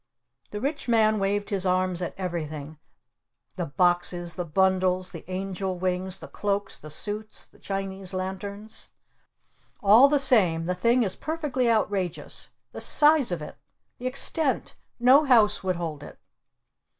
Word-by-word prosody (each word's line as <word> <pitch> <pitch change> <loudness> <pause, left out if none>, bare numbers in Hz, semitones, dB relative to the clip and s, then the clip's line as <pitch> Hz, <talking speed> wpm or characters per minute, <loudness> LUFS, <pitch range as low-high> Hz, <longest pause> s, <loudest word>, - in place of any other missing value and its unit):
The 210 - -5
Rich 280 +5 -3
Man 220 -2 +3
waved 200 +1 -1
his 195 -2 0
arms 185 -1 +1
at 175 - -4
everything, 155 -5 -5 0.8
the - - -3
boxes, 175 +2 +1
the 180 - -3
bundles, 185 +2 +1
the 165 - -9
angel 190 0 -3
wings, 185 +1 -2
the - - -10
cloaks, 205 0 -2
the 155 - -11
suits, 210 +7 -4
the - - -23
Chinese 195 -1 -3
Lanterns. 200 +3 -5 0.9
"All 220 +7 +8
the 295 - +3
same, 190 -12 +3
the 180 - 0
thing 235 +7 +2
is 190 -4 -2
perfectly 295 -6 -1
outrageous! 200 -6 -1 0.2
The - - -7
size 295 -6 +4
of 170 -3 -3
it! - - -10 0.4
The 250 - -3
extent! 275 +2 0 0.3
No 260 +5 +6
house 225 -7 +4
would 185 -1 0
hold 160 -4 -5
it!" - - -11
190 Hz, 145 wpm, -26 LUFS, 180-220 Hz, 0.9 s, All